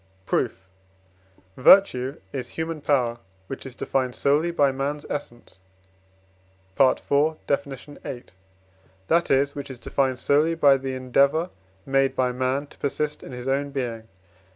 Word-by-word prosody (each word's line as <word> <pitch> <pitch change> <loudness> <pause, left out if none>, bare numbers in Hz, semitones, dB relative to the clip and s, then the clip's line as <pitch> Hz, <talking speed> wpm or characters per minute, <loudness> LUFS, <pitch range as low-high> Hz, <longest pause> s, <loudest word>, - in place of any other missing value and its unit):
Proof. 95 +1 -1 0.9
Virtue 130 -4 +5
is 125 -2 -4
human 160 -1 -3
power, 125 -5 +1 0.3
which 135 +4 -7
is 125 - -9
defined 130 -1 -1
solely 150 +4 +2
by 145 -5 +3
man's 140 +2 -3
essence 120 -8 -7 1.2
(IV. 140 +3 +3
Def. 140 0 0
viii.), 135 -2 -8 0.9
that 170 +1 +3
is, 140 +1 +2
which 140 -1 -7
is 130 - -7
defined 130 +1 -1
solely 150 +5 +2
by 140 -4 +5
the 135 0 -4
endeavour 140 +6 +2 0.3
made 135 0 +2
by 125 -1 +1
man 130 +3 -1
to - - -20
persist 150 +1 -2
in - - -10
his 125 0 -7
own 140 +1 0
being. 120 -5 -4
135 Hz, 135 wpm, -24 LUFS, 130-145 Hz, 1.2 s, Virtue